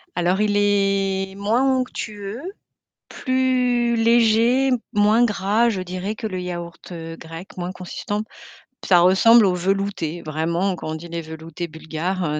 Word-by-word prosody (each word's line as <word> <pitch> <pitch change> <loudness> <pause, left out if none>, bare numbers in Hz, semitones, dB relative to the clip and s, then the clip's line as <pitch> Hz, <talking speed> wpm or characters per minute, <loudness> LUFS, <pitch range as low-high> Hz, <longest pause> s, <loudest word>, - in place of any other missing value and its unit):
Alors 180 +3 +1
il 210 -1 +2
est 195 -1 +1
moins 215 +6 +1 0.2
onctueux, 215 -2 -5 0.7
plus 250 -2 +1
léger, 230 +3 +3 0.2
moins 210 +3 +4
gras, 210 +2 +2
je 190 -4 -2
dirais 185 +4 -4
que 220 - -4
le 185 -2 -4
yaourt, 175 0 -7
heu, 165 -1 -7
grec, 165 +3 -10
moins 180 +1 -3
consistant. 205 +3 -5 0.6
Ça 175 -2 +6
ressemble 210 +5 +6
aux 185 - +2
veloutés, 190 -3 -2
vraiment 170 +5 -1
quand - - -7
on - - -3
dit: 170 +2 -8
«Les 170 0 -4
veloutés 160 +2 -7
bulgares», 160 +4 -4
heu, - - -2
195 Hz, 145 wpm, -22 LUFS, 175-220 Hz, 0.7 s, Ça